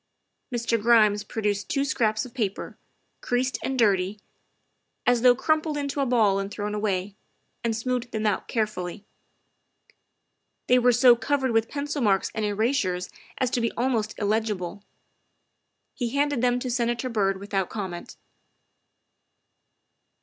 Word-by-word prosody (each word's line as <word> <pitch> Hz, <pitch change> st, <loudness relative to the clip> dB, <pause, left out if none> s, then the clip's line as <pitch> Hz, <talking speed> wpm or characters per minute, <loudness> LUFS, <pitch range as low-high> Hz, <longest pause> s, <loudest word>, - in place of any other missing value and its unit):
Mr. 235 Hz, -2 st, 0 dB
Grimes 215 Hz, -2 st, +4 dB
produced 205 Hz, -1 st, -2 dB
two 275 Hz, -1 st, +1 dB
scraps 215 Hz, -5 st, 0 dB
of 245 Hz, -, -12 dB
paper, 215 Hz, -7 st, -3 dB, 0.5 s
creased 255 Hz, +1 st, -1 dB
and 265 Hz, -, -2 dB
dirty, 200 Hz, -3 st, +2 dB, 0.9 s
as 245 Hz, -1 st, +3 dB
though 250 Hz, 0 st, +6 dB
crumpled 310 Hz, +2 st, 0 dB
into 280 Hz, 0 st, -3 dB
a 275 Hz, -, +1 dB
ball 215 Hz, -5 st, +3 dB
and 195 Hz, 0 st, -3 dB
thrown 205 Hz, 0 st, -4 dB
away, 200 Hz, -2 st, -1 dB, 0.5 s
and 230 Hz, -1 st, 0 dB
smoothed 245 Hz, +1 st, -2 dB
them 220 Hz, -1 st, -2 dB
out 210 Hz, -3 st, 0 dB
carefully. 205 Hz, -4 st, -3 dB, 1.6 s
They 250 Hz, 0 st, +4 dB
were 245 Hz, 0 st, +4 dB
so 245 Hz, +1 st, +6 dB
covered 260 Hz, +2 st, 0 dB
with 225 Hz, 0 st, +1 dB
pencil 290 Hz, 0 st, -3 dB
marks 195 Hz, -4 st, +2 dB
and 220 Hz, -, -2 dB
erasures 205 Hz, -4 st, 0 dB, 0.3 s
as 255 Hz, -2 st, 0 dB
to 245 Hz, -, 0 dB
be 230 Hz, -, 0 dB
almost 230 Hz, -3 st, -1 dB
illegible. 205 Hz, -3 st, -2 dB, 1.1 s
He 240 Hz, -2 st, -2 dB
handed 285 Hz, -3 st, +1 dB
them 245 Hz, 0 st, +2 dB
to 255 Hz, -, -3 dB
Senator 240 Hz, +1 st, 0 dB
Byrd 195 Hz, -5 st, 0 dB
without 195 Hz, -2 st, -2 dB
comment. 190 Hz, -5 st, -6 dB
225 Hz, 135 wpm, -25 LUFS, 205-250 Hz, 1.6 s, though